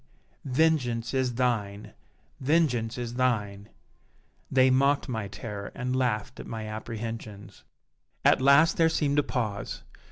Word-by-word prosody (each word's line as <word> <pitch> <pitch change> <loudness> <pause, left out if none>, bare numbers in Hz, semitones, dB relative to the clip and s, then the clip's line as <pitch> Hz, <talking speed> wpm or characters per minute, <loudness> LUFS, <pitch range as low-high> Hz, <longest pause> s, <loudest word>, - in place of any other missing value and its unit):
vengeance 130 -5 +1
is 130 -2 0
thine! 110 -5 -1 0.5
vengeance 130 -6 +1
is 120 -1 -4
thine!' 105 -5 -1 0.8
They 130 0 +4
mocked 140 +3 +2
my 110 -5 -3
terror 100 -1 -7
and 125 0 -2
laughed 125 -5 -1
at - - -8
my 110 -1 -5
apprehensions. 110 -1 -7 0.6
"At - - +5
last 140 +5 +5
there 165 -1 +4
seemed 145 -2 +1
a - - +5
pause. 110 -7 -3
120 Hz, 125 wpm, -27 LUFS, 110-135 Hz, 0.8 s, At